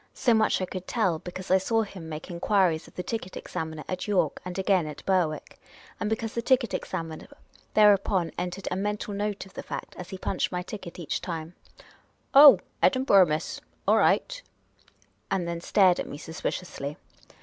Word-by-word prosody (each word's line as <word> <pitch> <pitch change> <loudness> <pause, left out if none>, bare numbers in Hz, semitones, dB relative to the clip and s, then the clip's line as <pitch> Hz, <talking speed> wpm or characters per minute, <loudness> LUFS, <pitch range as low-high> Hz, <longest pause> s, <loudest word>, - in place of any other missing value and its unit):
So 240 - +3
much 220 -1 +3
I - - 0
conld 185 0 -7
tell, 190 -9 +1
because 180 +2 -7
I 190 - +6
saw 225 +4 +1
him 185 -6 -9
make 155 +2 -7
en 170 - -6
(luiries 185 -5 +2
of - - -18
the 180 - -4
ticket 205 -4 -5
examiner 160 -1 -5
at 185 +2 -4
York, 205 -3 +1
and 180 0 -6
again 190 -4 +2
at 150 - -9
Berwick, 175 -5 0 0.4
and 210 - -1
because 220 0 -2
the 235 - -1
ticket 245 -2 +2
examiner 165 -1 -4 0.5
thereupon 200 -4 +4
entered 180 +2 -4
a - - 0
mental 205 +1 -2
note 205 0 -3
of 195 - -17
the - - -6
fact - - -7
as 180 - -7
he 190 - -6
punched 185 - -1
my 180 -1 -2
ticket 180 -3 -8
each 170 -4 -3
time: 165 -1 -5 0.8
"Oh, 280 -5 +10 0.2
Kdinburgh, 255 -9 +5
miss? 155 0 -3 0.3
All - - +5
right - - +2 0.5
"; - - -38
and 185 -3 -1
then 170 0 -4
stared 185 -1 +4
at - - -3
me - - -7
sus 160 +3 -9
piciously. 145 -5 -4
185 Hz, 190 wpm, -27 LUFS, 170-210 Hz, 0.8 s, Oh